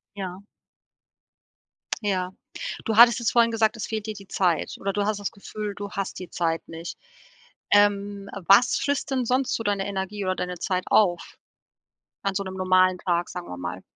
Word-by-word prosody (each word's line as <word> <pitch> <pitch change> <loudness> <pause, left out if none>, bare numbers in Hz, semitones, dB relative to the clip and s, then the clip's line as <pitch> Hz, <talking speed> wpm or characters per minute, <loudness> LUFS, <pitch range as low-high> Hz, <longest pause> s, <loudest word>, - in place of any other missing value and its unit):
Ja. 185 -2 -5 1.6
Ja, 185 -3 0 0.6
du 220 - 0
hattest 235 +1 +8
es 235 - +1
vorhin 235 -1 +4
gesagt, 225 0 +2
es 220 - -3
fehlt 220 -1 -4
dir 215 - -3
die 195 -1 -11
Zeit 180 -4 0
oder 195 0 -2
du 205 - 0
hast 210 0 0
das 205 - -3
Gefühl, 210 +1 -6
du 200 -1 -6
hast 195 -1 -4
die 185 -2 -8
Zeit 165 -1 -1
nicht 165 +1 -7 0.7
ähm, 205 -1 +3 0.2
was 200 +6 +6
frisst 285 0 -1
denn 260 -2 +1
sonst 255 +2 +1
so - - -3
deine 200 -2 0
Energie 200 +1 -3
oder 185 0 0
deine 180 -1 -4
Zeit 185 0 -1
auf 180 -5 +2 0.9
an 200 -1 -1
so 200 - 0
'nem 190 -1 -6
normalen 185 -1 +3
Tag, 175 -1 0
sagen 180 -1 -6
wir 90 - -7
mal? 90 +1 -5
200 Hz, 180 wpm, -25 LUFS, 185-215 Hz, 1.6 s, hattest